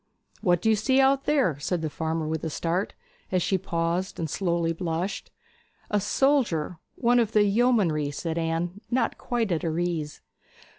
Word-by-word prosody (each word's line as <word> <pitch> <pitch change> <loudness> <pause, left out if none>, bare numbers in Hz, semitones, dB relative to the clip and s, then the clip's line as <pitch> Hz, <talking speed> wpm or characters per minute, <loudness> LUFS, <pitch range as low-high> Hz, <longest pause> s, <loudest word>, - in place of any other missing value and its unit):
'What 175 -2 +2
do 220 - +3
you - - +4
see 260 +6 +2
out 270 0 +3
there?' 255 - +2
said 170 +3 -2
the - - 0
farmer 160 0 -2
with 160 0 -3
a 160 - -1
start, 170 +5 -2 0.4
as 185 -2 +2
she 190 - +1
paused 170 +1 -2
and 165 - -2
slowly 170 0 0
blushed. 170 +2 -3 0.6
'A 210 - +3
soldier 205 - +1 0.2
one 245 0 +3
of 225 -2 0
the 210 - +5
yeomanry,' 200 - +2
said 160 +3 -3
Anne, 165 +4 -2
not 255 +1 0
quite 235 -5 -1
at 165 - 0
her 165 -2 -2
ease. 165 -4 -2
175 Hz, 175 wpm, -26 LUFS, 165-220 Hz, 0.6 s, the